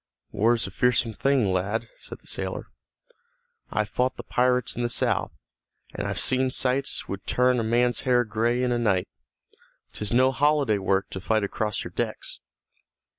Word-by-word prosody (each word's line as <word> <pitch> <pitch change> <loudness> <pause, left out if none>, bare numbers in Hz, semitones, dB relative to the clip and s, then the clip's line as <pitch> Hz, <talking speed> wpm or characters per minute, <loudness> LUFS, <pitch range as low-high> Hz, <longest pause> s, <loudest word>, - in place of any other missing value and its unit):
"War's 115 +2 +2
a 95 - -7
fearsome 120 +1 +1
thing, 125 -5 +2
lad," 105 +5 -1
said - - -8
the - - -28
sailor. - - -4 1.0
"I've 105 -1 -1
fought 125 +3 0
the 120 - -7
pirates 125 +1 +1
in 120 - -3
the 120 - 0
south, - - +1 0.6
and - - -3
I've - - -3
seen 130 0 +3
sights 130 +2 0
would 100 0 -6
turn 125 0 +3
a - - 0
man's 120 +2 +1
hair 125 -1 +3
gray 120 +3 0
in 125 - +1
a 120 - +1
night. 100 -6 +1 0.9
'Tis 105 -1 -3
no 130 +2 +4
holiday 140 -6 +2
work 95 0 0
to 95 - -6
fight 110 +2 +1
across 105 +1 -2
your - - -8
decks." - - -4
120 Hz, 170 wpm, -25 LUFS, 105-125 Hz, 1.0 s, no